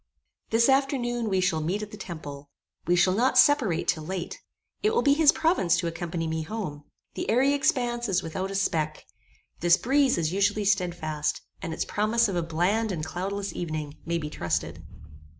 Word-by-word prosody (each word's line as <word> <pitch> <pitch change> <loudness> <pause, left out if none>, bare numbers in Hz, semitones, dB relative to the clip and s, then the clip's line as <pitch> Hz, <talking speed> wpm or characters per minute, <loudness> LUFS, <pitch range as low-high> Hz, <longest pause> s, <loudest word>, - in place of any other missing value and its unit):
This 230 +1 +4
afternoon 255 -4 +1
we 190 -1 +1
shall 160 -4 +1
meet 185 +7 -2
at 210 - -8
the - - -8
temple. 145 -8 -8 0.4
We 175 - +4
shall 185 +1 +4
not 255 +5 +2
separate 255 - +4
till 165 -2 +1
late. 180 +1 -5 0.4
It 430 +2 +1
will - - +2
be 280 - +5
his 300 0 +6
province 320 - +2
to 175 - -2
accompany 170 0 -3
me 160 0 -2
home. 155 -6 -5 0.3
The - - -4
airy 265 +5 +3
expanse 240 -4 0
is 185 -1 +1
without 185 +4 -4
a 195 - -5
speck. 155 -6 -1 0.5
This 175 +1 +5
breeze 270 +4 +2
is 165 0 -1
usually 205 +1 +1
stedfast, 175 -6 -1 0.2
and 175 -4 -4
its - - -2
promise 215 +3 +1
of 195 - -3
a 175 - +1
bland 180 +7 0
and 160 -4 -3
cloudless 195 +4 -4
evening, 155 -3 -4
may 170 0 -1
be 150 -2 -5
trusted. 85 - -3
190 Hz, 185 wpm, -26 LUFS, 165-230 Hz, 0.5 s, his